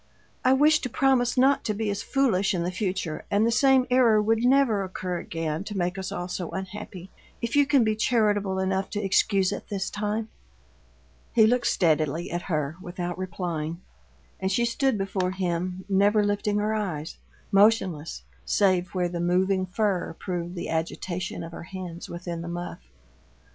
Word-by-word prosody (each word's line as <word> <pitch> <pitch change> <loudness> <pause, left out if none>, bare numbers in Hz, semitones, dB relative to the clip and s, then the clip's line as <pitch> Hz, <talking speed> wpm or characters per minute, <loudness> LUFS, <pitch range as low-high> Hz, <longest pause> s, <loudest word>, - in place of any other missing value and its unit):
I 255 0 +5
wish 305 +3 +5
to 255 - -4
promise 260 -2 +2
not 270 +2 +4
to 215 - -1
be 220 +1 -2
as 200 +1 -3
foolish 225 -9 +1
in 170 - -1
the 175 - -1
future, 185 -4 -3
and 205 +2 +3
the 230 - +2
same 265 +1 +4
error 240 -4 +5
would 225 +2 +1
never 250 -5 +4
occur 185 -1 -4
again 165 0 -3
to 205 -1 -5
make 180 0 0
us 190 -1 -5
all 175 - -4
so 180 -1 -4
unhappy, 190 -1 -7 0.3
if 235 +3 -3
you 285 -1 +5
can 280 -4 +4
be 215 -1 +1
charitable 210 -4 +1
enough 190 0 0
to 205 - -3
excuse 195 -1 +2
it - - -6
this 195 -2 -3
time." 210 +1 -2 1.0
He 220 - +6
looked 240 +2 +2
steadily 160 0 +1
at 175 +1 -2
her 155 -3 -2
without 175 0 -5
replying, 170 -3 -3 0.6
and 190 0 -1
she 235 +5 +2
stood 250 +1 +1
before 195 -2 -1
him, 185 0 -2
never 205 +2 +3
lifting 205 0 0
her 210 +1 0
eyes; 180 -8 -3 0.3
motionless, 195 -6 +2 0.2
save 185 -2 +1
where 180 -1 +1
the 175 0 -4
moving 185 +2 +1
fur 185 -3 -1
proved 175 -1 -4
the 175 - -5
agitation 170 +2 -3
of 165 - -8
her - - -8
hands 180 -1 -7
within 170 -1 -5
the 170 - -6
muff. 175 +1 -5
190 Hz, 175 wpm, -26 LUFS, 175-215 Hz, 1.0 s, He